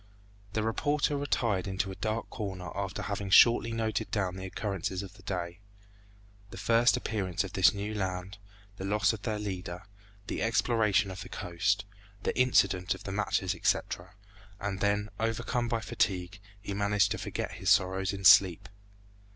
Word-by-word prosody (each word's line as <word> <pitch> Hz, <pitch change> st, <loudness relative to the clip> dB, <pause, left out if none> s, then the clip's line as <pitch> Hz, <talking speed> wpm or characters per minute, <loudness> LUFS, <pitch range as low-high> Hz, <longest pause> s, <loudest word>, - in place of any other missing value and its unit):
The 110 Hz, -, 0 dB
reporter 145 Hz, +6 st, 0 dB
retired 115 Hz, -9 st, 0 dB
into 95 Hz, 0 st, -2 dB
a -, -, -7 dB
dark 110 Hz, +2 st, -2 dB
corner 95 Hz, -5 st, -5 dB
after 100 Hz, +1 st, -3 dB
having 100 Hz, 0 st, -3 dB
shortly 115 Hz, +3 st, +6 dB
noted 110 Hz, -2 st, -2 dB
down 95 Hz, -3 st, -1 dB
the 95 Hz, 0 st, -6 dB
occurrences 95 Hz, -1 st, -3 dB
of 95 Hz, -1 st, -10 dB
the 105 Hz, -, -17 dB
day; 90 Hz, -2 st, -4 dB, 0.9 s
the -, -, -10 dB
first 115 Hz, +5 st, +3 dB
appearance 100 Hz, -8 st, -2 dB
of 100 Hz, -, -8 dB
this 95 Hz, -, +5 dB
new 105 Hz, +1 st, -4 dB
land, 95 Hz, 0 st, -4 dB, 0.4 s
the -, -, -6 dB
loss 100 Hz, 0 st, +2 dB
of 110 Hz, -, -7 dB
their 110 Hz, -1 st, -2 dB
leader, 95 Hz, -3 st, -5 dB, 0.4 s
the -, -, -4 dB
exploration 110 Hz, -3 st, +2 dB
of 95 Hz, -, -7 dB
the -, -, -8 dB
coast, 100 Hz, +4 st, -1 dB, 0.4 s
the -, -, -1 dB
incident 100 Hz, -8 st, +3 dB
of -, -, -12 dB
the 95 Hz, -, -5 dB
matches, 95 Hz, -2 st, 0 dB
etc.; 90 Hz, 0 st, -1 dB, 0.4 s
and 100 Hz, -1 st, -3 dB
then 105 Hz, +1 st, +1 dB
overcome 115 Hz, +2 st, -1 dB
by 115 Hz, -1 st, -1 dB
fatigue, 100 Hz, -4 st, -1 dB, 0.2 s
he 100 Hz, 0 st, -5 dB
managed 100 Hz, 0 st, +2 dB
to 110 Hz, -, -2 dB
forget -, -, -4 dB
his -, -, -3 dB
sorrows 95 Hz, +1 st, +3 dB
in 100 Hz, -1 st, -6 dB
sleep. 95 Hz, +1 st, +6 dB
100 Hz, 165 wpm, -30 LUFS, 95-110 Hz, 0.9 s, shortly